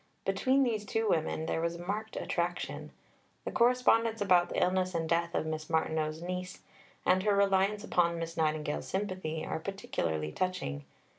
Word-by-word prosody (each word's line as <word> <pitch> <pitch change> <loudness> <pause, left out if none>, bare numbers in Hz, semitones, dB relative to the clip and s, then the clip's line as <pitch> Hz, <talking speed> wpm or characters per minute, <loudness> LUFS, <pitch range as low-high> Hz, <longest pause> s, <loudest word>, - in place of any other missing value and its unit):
Between 270 +1 +3
these 225 -5 0
two 225 +2 -1
women 160 -3 0
there 165 - -1
was 170 0 -1
a 175 +1 -8
marked 215 +3 -3
attraction. 175 0 -2 0.5
The - - -2
correspondence 235 -2 +3
about 180 -4 +4
the - - -1
illness 185 0 +1
and 165 -1 0
death 170 +1 0
of - - 0
Miss 155 0 -4
Martineau's 160 0 0
niece, 180 +1 -5 0.4
and 185 +1 +4
her 205 +1 +2
reliance 200 +1 +2
upon 170 -5 +2
Miss 165 0 -4
Nightingale's 155 -2 -1
sympathy, 185 -5 -3
are - - -3
particularly 80 - -3
touching. 70 - -2
180 Hz, 160 wpm, -31 LUFS, 160-200 Hz, 0.5 s, about